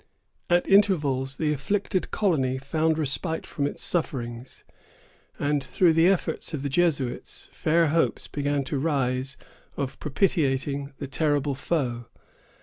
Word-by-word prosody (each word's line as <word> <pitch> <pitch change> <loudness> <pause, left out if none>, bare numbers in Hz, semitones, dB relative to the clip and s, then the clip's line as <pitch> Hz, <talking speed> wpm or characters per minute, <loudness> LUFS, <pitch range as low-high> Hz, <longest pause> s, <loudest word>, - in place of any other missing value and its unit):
At 175 0 +3
intervals, 145 -10 +3
the 150 -1 +1
afflicted 185 +6 -1
colony 140 -11 +1
found 155 +4 0
respite 160 +2 -2
from 140 -1 -2
its - - -6
sufferings; 125 -7 -3 0.7
and, 145 -1 0
through 170 +5 +3
the 165 +2 +5
efforts 185 -3 0
of 140 - -5
the 140 - -1
Jesuits, 140 -5 -1
fair 165 0 +2
hopes 165 +2 +1
began 145 -1 -1
to 135 +1 -2
rise 135 -2 -1 0.4
of 140 -1 -3
propitiating 140 -4 0
the - - -5
terrible 145 0 0
foe. 130 -5 -2
145 Hz, 130 wpm, -26 LUFS, 135-165 Hz, 0.7 s, the